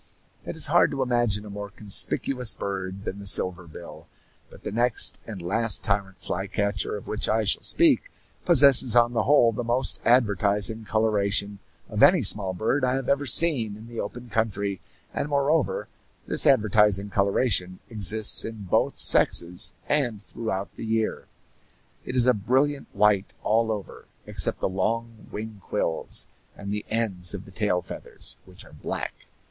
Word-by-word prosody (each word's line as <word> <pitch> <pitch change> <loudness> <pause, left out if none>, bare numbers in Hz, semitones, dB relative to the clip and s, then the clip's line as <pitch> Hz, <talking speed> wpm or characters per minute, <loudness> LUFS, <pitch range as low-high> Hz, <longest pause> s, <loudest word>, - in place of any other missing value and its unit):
It - - -6
is - - 0
hard - - +3
to 135 -1 -3
imagine 120 -4 -1
a 105 - -10
more 100 0 -7
conspicuous 110 +5 +1
bird 95 0 -6
than 100 -1 -6
the 100 - -8
silver 90 -2 +2
bill; 80 - -13 0.4
but - - -17
the - - -5
next 120 +2 +1
and 105 -4 -8
last 110 +4 +1
tyrant 100 -2 -2
flycatcher 100 +1 -3
of 100 - -12
which 110 - -2
I 110 0 +1
shall 105 - 0
speak 335 - +3 0.3
possesses 140 -7 +6
on 120 0 +3
the 115 -2 -1
whole 125 -3 +4
the 120 +2 -5
most 120 +3 +2
advertising 105 -2 +1
coloration 105 -2 -1 0.3
of 105 -2 -4
any 175 -6 +5
small 95 -2 +1
bird 120 +9 -1
I 125 0 +1
have 135 -1 -4
ever 140 0 0
seen 120 -7 +4
in 110 - -13
the 115 -1 -9
open 120 0 -7
country, 100 -4 -3 0.3
and 145 - -4
moreover 145 +2 -1 0.4
this - - +4
advertising 105 -5 +2
coloration 100 -2 0
exists 110 -1 +3
in 110 -2 -8
both 95 - -1
sexes 85 +1 +3 0.2
and 125 -8 0
throughout 100 -2 -6
the - - -8
year. 110 0 -2 0.8
It 125 - -6
is 125 -2 +3
a 125 - +4
brilliant 135 +7 -1
white, 105 -2 +1
all 110 +1 0
over, 105 -5 -8 0.2
except - - +2
the - - 0
long 115 +4 -4
wing 110 -1 -8
quills 85 -6 -1 0.3
and 100 0 -7
the 105 - -6
ends 100 -5 0
of 95 - -9
the 100 - -15
tail 95 -4 -2
feathers, - - -7
which - - -14
are - - -18
black. - - -7
110 Hz, 165 wpm, -24 LUFS, 100-120 Hz, 0.8 s, possesses